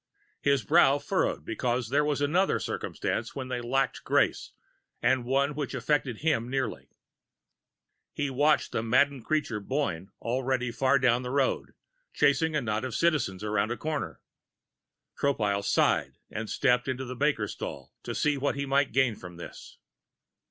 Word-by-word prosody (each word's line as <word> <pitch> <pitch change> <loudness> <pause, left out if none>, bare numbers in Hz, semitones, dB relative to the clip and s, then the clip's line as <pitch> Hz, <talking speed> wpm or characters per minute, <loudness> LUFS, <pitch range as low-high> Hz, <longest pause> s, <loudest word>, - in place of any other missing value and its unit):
His 140 -3 +2
brow 135 +7 +5
furrowed, 110 - -1
because 120 0 -1
there 145 +3 +3
was 150 -1 0
another 175 +7 +2
circumstance - - -3
when 130 -2 -5
they 125 -1 -2
lacked 130 +2 0
grace, - - +1 0.5
and 120 0 +2
one 140 +3 +1
which 145 -1 -4
affected 130 -2 0
him 125 -7 +1
nearly. 130 -3 -3 1.2
He 145 -2 -2
watched 145 +4 +2
the - - -1
maddened 130 +2 +2
creature, 150 -8 0
Boyne, 100 - -2
already 125 +1 -1
far 130 +3 +3
down 125 -2 +3
the 125 - -5
road, 135 0 0 0.4
chasing 155 +3 +3
a 150 - +2
knot 110 -2 -2
of 130 -3 -4
Citizens 145 - +1
around 105 0 0
a 120 - -2
corner. 145 - -3 1.0
Tropile 105 -8 0
sighed - - +1
and 110 +1 -4
stepped 125 -1 +2
into 130 0 -2
the 125 +1 -6
baker's 135 -6 0
stall 70 - -7
to - - -5
see 150 -1 +1
what 140 +1 0
he 140 0 -2
might 135 0 +1
gain 130 -3 +3
from 90 -3 -11
this. 85 - -10
130 Hz, 155 wpm, -28 LUFS, 115-140 Hz, 1.2 s, brow